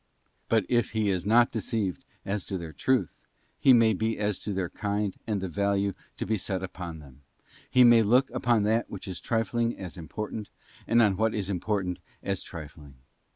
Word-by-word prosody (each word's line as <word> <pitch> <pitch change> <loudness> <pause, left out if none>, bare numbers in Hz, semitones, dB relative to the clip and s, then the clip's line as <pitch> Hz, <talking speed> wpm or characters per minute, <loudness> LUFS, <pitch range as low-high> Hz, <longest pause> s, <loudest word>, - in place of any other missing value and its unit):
But 110 -4 +3
if 120 -2 +1
he 110 -2 +1
is 90 0 -2
not 120 +2 +5
deceived 105 -3 -2 0.2
as 100 -1 -2
to 95 - -2
their 85 -3 -7
truth, 120 - -1 0.3
he 135 - +6
may 115 -3 +6
be 110 +3 -1
as 105 -2 0
to 105 - -4
their 95 -2 -1
kind 105 -2 -2
and 105 -3 0
the 95 - -2
value 100 +2 0 0.2
to - - -3
be 110 -2 0
set 95 0 -3
upon 90 -3 -6
them; 70 -3 -15 0.5
he 125 -1 +6
may 120 -1 +7
look 125 +5 +3
upon 120 -3 +2
that 110 +3 +1
which 100 - -7
is 95 -3 -5
trifling 115 +1 0
as 90 -2 -8
important, 105 +5 -5 0.4
and 120 0 +5
on 100 -3 +2
what 110 +1 +1
is 100 -2 -2
important 95 -1 -1 0.2
as 100 -1 -1
trifling. 75 -4 -10
105 Hz, 190 wpm, -28 LUFS, 95-115 Hz, 0.5 s, may